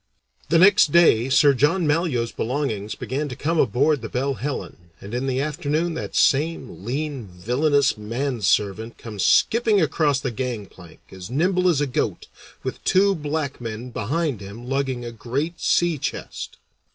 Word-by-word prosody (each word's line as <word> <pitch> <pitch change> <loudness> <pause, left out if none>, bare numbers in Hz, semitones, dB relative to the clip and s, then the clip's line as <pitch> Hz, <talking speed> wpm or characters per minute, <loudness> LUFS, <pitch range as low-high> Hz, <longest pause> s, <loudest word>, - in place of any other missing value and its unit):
The 165 - +4
next 190 -3 +6
day 135 -8 +5
Sir 140 +2 +5
John 150 +7 +2
Malyoe's 150 -7 0
belongings 110 -5 -3
began 145 +3 -3
to 125 - -6
come 160 +5 -1
aboard 140 +2 +2
the 115 - -6
Belle 135 +2 -1
Helen, 120 -8 -6
and 100 +3 -10
in 125 +2 -2
the 130 0 0
afternoon 150 +3 -1
that 160 - -6
same 145 - +1
lean, 135 0 -3
villainous 125 - +1
manservant 110 -2 -1
comes 105 -4 -5
skipping 225 -2 +3
across 150 -4 +1
the 135 -2 -3
gangplank 105 -8 -6
as 95 -1 -9
nimble 180 +7 +2
as 155 -5 +2
a - - +2
goat, 130 - -2 0.4
with - - -5
two 195 +1 +4
black 150 -5 -3
men 115 +2 -6
behind 135 +2 -2
him 105 +5 -9
lugging 135 -2 -2
a 120 - -5
great 135 +9 -3
sea 175 -4 +2
chest. 145 - -5
135 Hz, 155 wpm, -23 LUFS, 115-155 Hz, 0.4 s, next